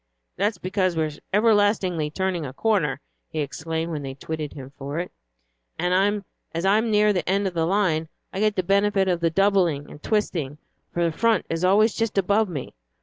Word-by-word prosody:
"That's 205 +3 0
because 185 -1 0
we 160 - +2
are 155 - -2 0.2
everlastingly 205 -6 +3
turning 185 +1 -1
a 130 -3 -6
corner," 185 -5 +1 0.3
he - - -7
explained, 160 +3 -3
when 150 -2 -3
they 135 -1 -6
twitted 155 +1 -5
him 135 -2 -9
for 140 +2 -5
it, 175 +1 -3 0.7
"and 195 +3 +1 0.3
as 165 +3 -2
I'm 215 +4 +3
near 210 0 +4
the 180 -1 -1
end 200 +1 +2
of 190 - -1
the 165 -1 0
line 170 -5 +1 0.2
I 190 - -3
get 215 0 +2
the 185 - 0
benefit 195 +1 +2
of 180 -2 +1
the 170 -1 +2
doubling 175 -5 +2
and 150 - -12
twisting, 165 -10 -1 0.3
for 170 - 0
the 165 -2 0
front 230 -1 +2
is 165 +1 -2
always 205 +4 +4
just 225 -3 -2
above 200 +2 +2
me. 145 -7 -5
185 Hz, 195 wpm, -24 LUFS, 160-205 Hz, 0.7 s, near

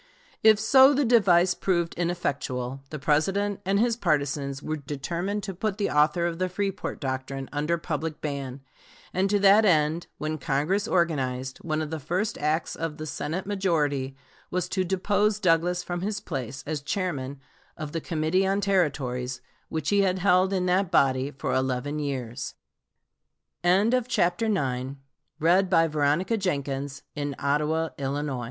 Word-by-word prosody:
If 215 -1 +6
so, 265 +5 +6
the 285 0 +2
device 190 -7 +5
proved 170 -3 0
ineffectual. 140 -7 -2
The 155 - -5
President 195 +8 +1
and 200 +1 +2
his 235 +1 +2
partisans 145 - -1
were 155 0 -2
determined 170 +8 -3
to 195 0 -4
put 195 +2 -2
the 205 - 0
author 150 +3 +3
of 170 0 -2
the 185 0 0
"Freeport 195 +1 -3
doctrine" 135 0 -4
under 150 +4 0
public 160 -2 -4
ban, 140 -3 -4 0.5
and 190 +2 +1
to 205 - +3
that 200 +2 +7
end, 160 -3 +2
when 155 0 -3
Congress 155 +11 0
organized, 130 - 0
one 155 -1 -2
of 155 - -6
the 160 - -3
first 180 +9 -2
acts 155 +2 0
of 165 -2 -4
the 155 - -5
Senate 160 +4 -3
majority 150 -9 0 0.3
was 180 0 -1
to 190 - 0
depose 200 +3 +1
Douglas 180 -1 +2
from 175 -1 -4
his 205 +2 -2
place 135 - -5
as 150 -1 -3
chairman 145 -5 -3 0.4
of 155 -1 -5
the 165 - -3
Committee 165 +5 +1
on 195 +1 +1
Territories, 135 -10 0 0.3
which 160 -1 -2
he 200 0 +4
had 190 -1 +2
held 185 0 +3
in 185 -2 0
that 185 +1 +2
body 130 -2 +3
170 Hz, 130 wpm, -26 LUFS, 145-195 Hz, 0.5 s, that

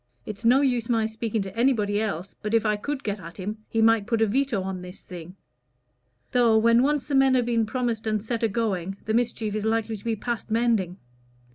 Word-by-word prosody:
It's 210 +1 -7
no 250 +4 +5
use 245 -4 0
my 225 -2 +2
speaking 220 -1 -2
to 195 +1 -9
anybody 220 -4 +2
else, 195 -3 -4
but 210 +2 -1
if 225 - +2
I 210 -1 +2
could 275 +6 -4
get 205 -1 -3
at 170 -1 -10
him, 210 +3 -5
he 225 -1 +1
might 225 -2 +4
put 230 -2 +1
a - - +5
veto 230 -2 0
on 190 -1 -4
this 180 +1 -10
thing. 180 0 -10 1.0
Though, 235 -3 +4
when 230 +2 +5
once 290 +1 +1
the 290 - -5
men 270 -1 +5
have 245 -2 +2
been 230 -2 +1
promised 230 -2 -2
and 215 -1 0
set 230 0 -3
a 225 - +3
going, 195 -4 -2
the 220 - -2
mischief 230 -2 0
is 215 -1 -2
likely 225 0 0
to 205 - -11
be 230 -1 -1
past 235 +2 -4
mending. 220 -6 +1
225 Hz, 225 wpm, -25 LUFS, 205-235 Hz, 1.0 s, no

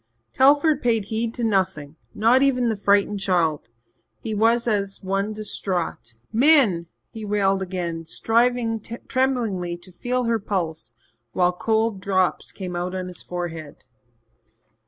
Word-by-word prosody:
Telford 285 +2 +4
paid 225 -4 +1
heed 225 +2 -2
to 240 - -4
nothing, 185 -9 0 0.2
not 235 +5 +4
even 250 -3 +2
the 220 - 0
frightened 200 0 +2
child. 170 - 0 0.5
He 220 - -4
was 230 +3 +2
as 200 -3 -1
one 195 +2 -1
distraught. 185 - -4 0.2
"Min," 230 - +4 0.2
he 220 - -8
wailed 200 -2 +1
again, 175 -3 -4
striving 230 +3 +1
tremblingly 230 -7 -2
to 175 +2 -14
feel 250 +7 -2
her 230 -1 +1
pulse 160 - -4 0.4
while 180 -1 +3
cold 220 +1 0
drops 185 -1 0
came 185 -3 -6
out 180 +1 -3
on 185 -1 -4
his 180 - -8
forehead. 165 -4 -6
200 Hz, 135 wpm, -23 LUFS, 180-230 Hz, 0.5 s, Telford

